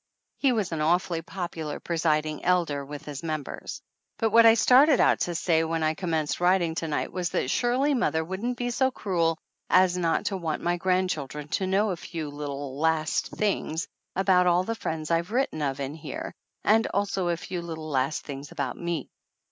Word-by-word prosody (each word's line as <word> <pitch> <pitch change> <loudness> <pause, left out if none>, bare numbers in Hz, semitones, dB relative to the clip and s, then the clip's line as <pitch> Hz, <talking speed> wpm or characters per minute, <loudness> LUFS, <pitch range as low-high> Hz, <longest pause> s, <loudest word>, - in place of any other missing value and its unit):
He 275 - +3
was 215 -7 0
an 160 -2 -2
awfully 170 +1 +1
popular 165 -4 -5
presiding 155 -2 0
elder 170 -6 +1
with 145 +1 -8
his 145 -2 -6
members. 155 -3 -5 0.3
But 225 -2 +1
what 230 +1 +8
I 225 - +8
started 260 +5 +6
out - - +4
to 175 - -1
say 160 0 +2
when 165 0 -1
I 155 0 +2
com 175 +2 -5
menced 155 -2 0
writing 175 -2 +3
to 165 0 -3
night 150 - -2
was 180 -2 -2
that 130 - -1
surely 255 +4 +2
mother 165 -11 +1
wouldn't 200 +9 -3
be 245 0 -2
so 260 +2 +2
cruel 170 -9 0 0.3
as 180 -1 +4
not 165 -2 +1
to 195 - -1
want 165 -4 -3
my 175 0 +1
grandchildren 170 -6 -1
to 190 - -1
know 200 +2 +2
a 180 - -3
few 160 -3 -6
little 145 -1 -5
last 160 -1 +1
things 185 -5 -1 0.3
about 185 -1 +4
all 175 +1 +4
the 230 - -2
friends 160 -7 -4
I've 170 +3 +1
written 245 - 0
of 140 -1 -1
in 140 +1 -3
here, 155 -3 -6 0.3
and 220 +2 +4
also 195 -2 -1
a 170 -1 +1
few 175 +1 -5
little 160 -2 -6
last 135 0 0
things 140 0 -7
about - - -3
me. 170 -5 -3
170 Hz, 195 wpm, -27 LUFS, 155-190 Hz, 0.3 s, what